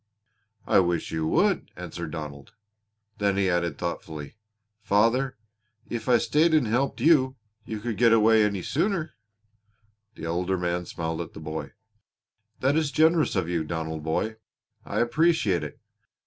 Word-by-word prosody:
"I - - +4
wish 85 -3 0
you 80 -1 -1
would," - - +2
answered 85 -2 -6
Donald. 75 0 -7 0.7
Then 100 -1 +1
he 95 -2 +2
added 85 -4 0
thoughtfully: 80 -3 -5 0.5
"Father, 115 +7 +2 0.5
if 115 0 -3
I 120 - +6
stayed 160 +7 +3
and 150 -5 +3
helped 125 +5 0
you, 130 -3 +4 0.3
could 110 -2 -5
you 120 -1 -1
get 115 +2 +4
away 110 -1 +5
any 100 -3 -1
sooner?" 170 +1 -1 1.0
The - - -7
older 90 +3 -1
man 90 -1 -2
smiled 80 0 -3
at 85 - -8
the - - -9
boy. 80 0 -6 0.9
"That 135 +3 +2
is 155 -2 +1
generous 160 +1 +3
of 95 -4 0
you, 85 -2 -1
Donald 80 0 -4
boy. 80 +8 -2 0.5
I - - -1
appreciate 120 - +2
it. 75 - -8
100 Hz, 150 wpm, -26 LUFS, 85-130 Hz, 1.0 s, I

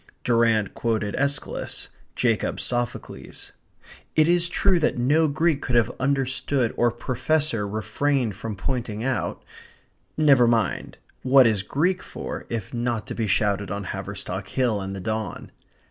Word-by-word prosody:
Durrant 115 -3 +2
quoted 110 -3 -1
Aeschylus 140 0 -2 0.3
Jacob - - 0
Sophocles. 120 -1 -4 0.6
It 155 0 +5
is 175 0 +3
true 185 0 +3
that 155 - +1
no 145 +6 +3
Greek 155 0 +1
could 125 - -1
have 120 -1 +4
understood 130 -2 0
or 120 - +3
professor 125 -1 -1
refrained 115 +2 0
from 110 +1 -5
pointing 115 0 -3
out 130 0 -2 0.7
Never 140 -6 +5
mind; 115 -4 0 0.2
what 130 0 +6
is 110 -4 +2
Greek 180 - 0
for - - -7
if 115 -2 -4
not 120 -2 -1
to - - -5
be 115 -2 -2
shouted 100 0 +1
on 100 0 -3
Haverstock 95 -1 -5
Hill 115 -2 0
in 95 0 -4
the 100 - -5
dawn? 110 -3 -4
120 Hz, 140 wpm, -24 LUFS, 105-140 Hz, 0.7 s, what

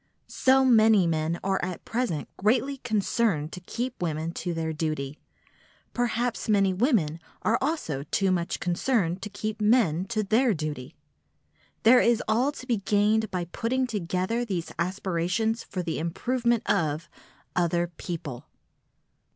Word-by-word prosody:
So 265 0 +3
many 220 -5 +6
men 160 0 0
are 195 0 0
at 180 -1 -4
present 225 -11 -2
greatly 250 +7 +1
concerned 215 - 0
to 180 - -7
keep 240 +7 -5
women 160 -1 -2
to 175 +1 -4
their 160 -1 -2
duty; 155 -2 -3 0.7
perhaps 240 -1 -1
many 195 -2 +3
women 185 - +1 0.2
are 230 - +2
also 265 - -1
too 195 -2 +2
much 175 -2 -1
concerned 180 -1 0
to 210 - -5
keep 215 +1 -4
men 210 -6 +3
to 215 +1 -1
their 225 +2 +3
duty. 150 -5 -5 0.9
There 245 +3 +7
is 235 0 +3
all 240 +6 +2
to 255 - -10
be 240 -3 +1
gained 210 +2 +2
by 180 -2 -2
putting 245 +9 -1
together 205 +1 -1
these 185 -7 -3
aspirations 185 +5 0
for 185 -2 -4
the 165 -2 -2
improvement 235 +8 0
of—other 170 +2 -1
people! 155 -8 -6
195 Hz, 135 wpm, -27 LUFS, 170-235 Hz, 0.9 s, There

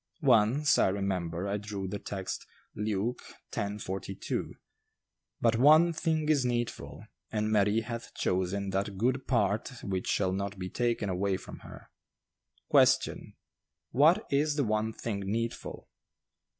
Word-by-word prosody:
Once, 125 +8 +4
I - - +5
remember, 95 -2 -2
I 100 +1 -1
drew 100 -2 -5
the 100 +2 -4
text, 95 -2 -5 0.3
Luke 105 +3 -2 0.3
x. 100 +1 -3
42: 95 +1 -4 0.8
"But 115 -1 +3
one 155 +6 +6
thing 160 -1 0
is 150 -4 +3
needful; 115 - -3 0.3
and 110 0 0
Mary 105 +1 +3
hath 115 +1 -7
chosen 95 +2 -1
that 100 0 -2
good 130 +5 0
part 110 -1 +1
which 95 -2 -3
shall 95 -2 +1
not 100 +1 -3
be 90 0 -5
taken 120 -3 0
away 95 +1 0
from - - -10
her." - - -13 0.8
Question, - - +3 0.6
"What 165 - +4
is 145 +2 +2
the 145 - +1
one 110 -1 0
thing 110 -2 -4
needful?" 115 +4 -4
105 Hz, 135 wpm, -30 LUFS, 95-120 Hz, 0.8 s, one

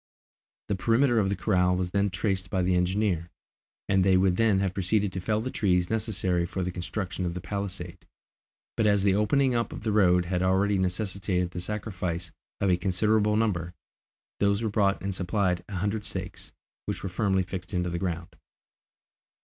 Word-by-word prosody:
The 100 - 0
perimeter 120 +4 +3
of 100 -2 +1
the 100 - 0
corral 90 -1 +2
was 90 -1 -2
then 100 +1 +1
traced 95 0 -2
by 95 -1 0
the 90 0 +2
engineer, 90 -1 0 0.6
and 95 -1 +3
they 95 0 +4
would 95 -1 +3
then 110 -1 +3
have 95 -1 0
proceeded 100 +1 0
to 95 - -3
fell 105 +3 0
the 130 +3 -4
trees 90 -3 +1
necessary 95 -5 0
for 95 +1 -3
the 90 - -2
construction 90 +1 -4
of 85 -1 -2
the - - -3
palisade, 90 -1 -5 0.7
but 110 - +2
as 100 -2 +3
the 100 -1 +4
opening 125 +6 +2
up 115 -1 0
of - - -7
the 110 - 0
road 90 -4 +4
had 90 0 -1
already 95 +2 +2
necessitated 95 -1 -1
the 90 - -5
sacrifice 90 -4 -4 0.3
of 100 -2 +2
a 90 - +3
considerable 105 +3 +2
number, 90 -6 0 0.6
those 100 +2 +2
were 110 - 0
brought 100 -1 +2
and 100 0 -2
supplied 90 -1 0
a 100 - -5
hundred 105 +3 -1
stakes, - - -6 0.4
which - - -3
were - - -2
firmly 95 0 +1
fixed 90 +1 -7
in 90 -2 0
the 85 -1 -2
ground. 85 -2 -4
95 Hz, 185 wpm, -27 LUFS, 90-105 Hz, 0.7 s, they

